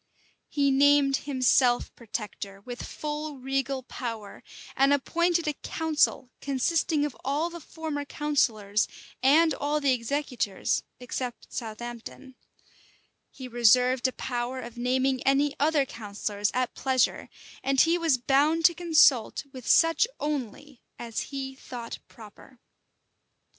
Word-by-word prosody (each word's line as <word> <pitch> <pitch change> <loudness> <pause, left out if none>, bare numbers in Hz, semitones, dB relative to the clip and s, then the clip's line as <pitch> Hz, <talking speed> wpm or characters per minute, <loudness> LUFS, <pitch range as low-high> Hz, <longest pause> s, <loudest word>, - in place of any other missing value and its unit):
He 280 -1 +2
named 280 0 +4
himself 255 -2 +3
protector 205 -3 -6
with 245 +3 -7
full 300 -1 -5
regal 270 0 -2
power, 230 -5 -7 0.3
and 275 +1 +4
appointed 340 +4 +1
a 300 - +1
council, 305 -4 0
consisting 290 +2 +1
of 295 - -5
all 295 +6 -1
the 340 - -8
former 310 -2 -5
counsellors, 230 -9 0 0.3
and 305 +5 +5
all 295 +2 -1
the 280 -3 +3
executors, 245 -5 -1 0.2
except 250 0 -6
Southampton; 240 +3 -7 1.0
he 260 - -9
reserved 250 +2 +4
a - - -3
power 245 +1 -3
of 235 -1 -8
naming 255 +1 0
any 280 +1 +2
other 295 -1 +3
counsellors 205 -2 -3
at 255 -1 -1
pleasure; 260 -3 0 0.3
and 270 0 +3
he 335 +2 +3
was 325 -6 +2
bound 290 +6 +2
to 345 - +7
consult 315 -10 +3
with 255 -3 -9
such 330 +7 +4
only 285 -1 -4 0.2
as 230 -2 -5
he 270 -1 -5
thought 245 -3 -8
proper. 230 +3 -15
270 Hz, 120 wpm, -27 LUFS, 240-295 Hz, 1.0 s, to